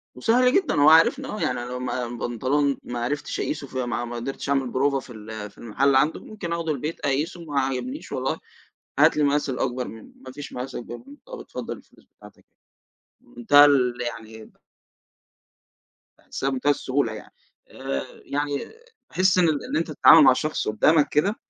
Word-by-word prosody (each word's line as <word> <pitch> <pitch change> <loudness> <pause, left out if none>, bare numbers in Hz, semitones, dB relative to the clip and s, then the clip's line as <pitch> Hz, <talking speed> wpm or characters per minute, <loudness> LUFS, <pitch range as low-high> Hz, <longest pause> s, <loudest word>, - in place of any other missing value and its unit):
وسهل 250 - +3
جدًا 380 -5 +2
هو 150 - +7
عارفني، 165 - +5
يعني 215 -6 -2
أنا 120 - -4
لو 125 - -4
ما 125 -1 -3
بنطلون 130 +4 -1
ما 120 -1 -5
عرفتش 145 +5 -3
أقيسه 145 -2 -3
في 130 -1 -3
ما 120 0 -3
ما 120 - -7
قدرتش 135 +3 -5
أعمل 135 -3 +1
بروفة 135 +1 +1
في 130 - -12
ال 110 -1 -8
في - - -28
المحل 130 +4 +1
عنده 145 +4 +2
ممكن 195 -6 -6
أخده 165 -2 -2
البيت 150 +3 -4
أقيسه، 150 +5 -2
ما 145 -2 -1
عجبنيش 190 - -4
والله - - -2 0.6
هات - - +5
لي 150 - +2
المقاس 145 0 +1
الأكبر 125 -1 -2
منّه، 110 -1 -12
ما 130 - -8
فيش 145 +1 -9
مقاس 125 +1 -6
أكبر 120 0 -6
منّه 285 - -13
خلاص - - -9
اتفضل - - -7
الفلوس - - -21
بتاعتك - - -17 0.8
أهية. - - -23
منتهى 145 -12 +6
ال 130 -4 +3
يعني 110 -2 -8 1.7
باحسها 135 - -4
منتهى 135 +2 +1
السهولة 130 -4 -1
يعني. 110 - -11 0.4
آآ، 70 0 -4 0.2
يعني 145 0 -2 0.4
باحس 185 0 +2
إن 170 -3 +4
إن 145 -1 -2
أنت 165 0 -2
تتعامل 150 +2 +7
مع 130 -1 +7
شخص 155 +4 -2
قدّامك 145 +8 +3
كده، 195 +9 +1
140 Hz, 175 wpm, -24 LUFS, 125-155 Hz, 1.7 s, هو